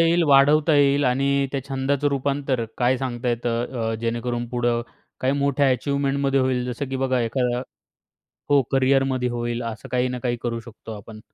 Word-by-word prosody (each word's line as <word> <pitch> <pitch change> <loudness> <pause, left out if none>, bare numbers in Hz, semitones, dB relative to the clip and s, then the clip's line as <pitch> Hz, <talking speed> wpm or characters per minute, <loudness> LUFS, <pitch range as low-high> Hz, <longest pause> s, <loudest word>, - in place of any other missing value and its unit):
येईल, 165 +1 +4
वाढवता 145 +3 +5
येईल 140 0 +4
आणि 140 +2 +2
त्या 140 - -1
छंदाचं 135 +1 0
रूपांतर 140 -2 -1
काय 125 +1 +3
सांगता 125 -1 -3
येतं, 120 0 -1
अ, - - -2
जेणेकरून 120 +1 -2
पुढं 120 -1 0 0.4
काही 130 +1 +1
मोठ्या 140 0 +2
अचीव्हमेंटमध्ये 140 +1 0
होईल. 130 -1 0
जसं, 135 +3 -5
की 135 - -3
बघा, 130 -1 +1
एका 120 +1 0 0.9
हो, 145 -1 +5
करियरमध्ये 135 -1 +2
होईल. 120 0 -3
असं 115 -1 -6
काही 125 0 +1
ना 125 0 -4
काही 120 -1 0
करू 115 -1 -2
शकतो 115 -1 -11
आपण. 110 +2 -11
130 Hz, 165 wpm, -23 LUFS, 120-140 Hz, 0.9 s, वाढवता